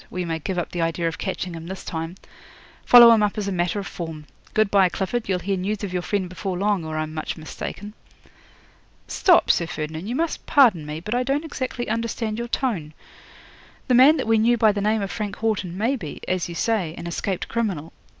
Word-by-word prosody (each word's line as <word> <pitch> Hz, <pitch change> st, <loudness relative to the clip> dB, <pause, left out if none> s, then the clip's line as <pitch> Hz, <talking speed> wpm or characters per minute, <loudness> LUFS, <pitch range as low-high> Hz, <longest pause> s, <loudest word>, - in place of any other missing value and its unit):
We 180 Hz, -1 st, -3 dB
may 165 Hz, -1 st, -2 dB
give 180 Hz, +4 st, -4 dB
up 175 Hz, -, -2 dB
the 175 Hz, -, -3 dB
idea 165 Hz, +1 st, 0 dB
of 165 Hz, -, -4 dB
catching 185 Hz, -2 st, -3 dB
him 165 Hz, 0 st, -8 dB
this 190 Hz, +1 st, -7 dB
time. 165 Hz, +1 st, -4 dB, 0.7 s
Follow 240 Hz, -1 st, +9 dB
him 225 Hz, -2 st, +5 dB
up 210 Hz, 0 st, 0 dB
as 205 Hz, -2 st, -2 dB
a -, -, -1 dB
matter 175 Hz, +1 st, 0 dB
of 200 Hz, -, -3 dB
form. 160 Hz, -5 st, -7 dB, 0.3 s
Good 215 Hz, -2 st, +3 dB
bye, 195 Hz, -2 st, +5 dB
Clifford. 200 Hz, +5 st, -3 dB
You'll 185 Hz, -, +2 dB
hear 190 Hz, +2 st, -2 dB
news 205 Hz, +3 st, -3 dB
of 190 Hz, -3 st, -4 dB
your 180 Hz, -, 0 dB
friend 190 Hz, 0 st, -1 dB
before 185 Hz, +1 st, -4 dB
long, 200 Hz, -2 st, +1 dB
or 155 Hz, 0 st, -4 dB
I'm 155 Hz, 0 st, -3 dB
much 155 Hz, +2 st, -4 dB
mistaken." 205 Hz, +6 st, -7 dB, 1.1 s
'"Stop, 360 Hz, -3 st, +4 dB
Sir 170 Hz, -, 0 dB
Ferdinand, 160 Hz, +3 st, -5 dB
you 240 Hz, -, -2 dB
must 330 Hz, +3 st, -2 dB
pardon 220 Hz, -, +4 dB
me; 150 Hz, +1 st, -5 dB
but 210 Hz, +6 st, -4 dB
I 245 Hz, -, +1 dB
don't 275 Hz, +5 st, -1 dB
exactly 255 Hz, -5 st, -4 dB
understand 225 Hz, 0 st, -2 dB
your 235 Hz, -, -3 dB
tone. 195 Hz, -, -2 dB, 0.9 s
The 255 Hz, -, +2 dB
man 270 Hz, +6 st, +7 dB
that 265 Hz, -, -2 dB
we 225 Hz, 0 st, +3 dB
knew 235 Hz, +2 st, +3 dB
by 220 Hz, -1 st, +5 dB
the 205 Hz, 0 st, -3 dB
name 215 Hz, 0 st, +1 dB
of 195 Hz, -, -4 dB
Frank 210 Hz, -3 st, -4 dB
Haughton 200 Hz, -5 st, -2 dB
may 230 Hz, +7 st, +1 dB
be, 165 Hz, -, -7 dB
as 185 Hz, -1 st, -1 dB
you 170 Hz, -, -6 dB
say, 185 Hz, -6 st, 0 dB
an 170 Hz, -, -7 dB
escaped 175 Hz, +2 st, -3 dB
criminal. 195 Hz, -9 st, -2 dB
195 Hz, 220 wpm, -23 LUFS, 170-225 Hz, 1.1 s, Follow